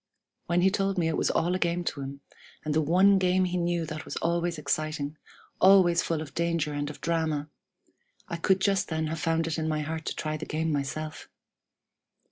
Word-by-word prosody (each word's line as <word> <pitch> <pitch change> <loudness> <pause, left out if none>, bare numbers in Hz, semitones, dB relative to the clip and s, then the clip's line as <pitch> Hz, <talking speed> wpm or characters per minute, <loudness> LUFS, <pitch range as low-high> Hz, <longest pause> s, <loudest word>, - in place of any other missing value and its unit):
When 175 +1 +2
he 190 +1 +4
told 195 -1 0
me 170 -2 +2
it 160 - -1
was - - +1
all 175 +2 +1
a 185 - 0
game 175 0 0
to 145 - -3
him, 140 +1 -7 0.4
and 150 - 0
the 155 - +3
one 190 +6 +5
game 185 0 +3
he 180 0 -2
knew 175 -1 0
that 155 0 -6
was - - -7
always 170 0 0
exciting, 150 0 -2 0.4
always 185 -3 +6
full 160 -2 -2
of 150 - -12
danger 170 -3 0
and 145 0 -2
of 150 - -10
drama, 160 -3 -1 0.8
I 170 - -4
could 190 +3 +2
just 195 -1 +2
then 160 -1 -1
have 160 +1 -3
found 165 +1 +1
it 165 0 -2
in 160 - -1
my 155 -1 0
heart 160 +1 -4
to - - -3
try 155 -1 -3
the 160 - -7
game 160 +1 -1
myself! 155 +2 -4
165 Hz, 210 wpm, -28 LUFS, 155-175 Hz, 0.8 s, always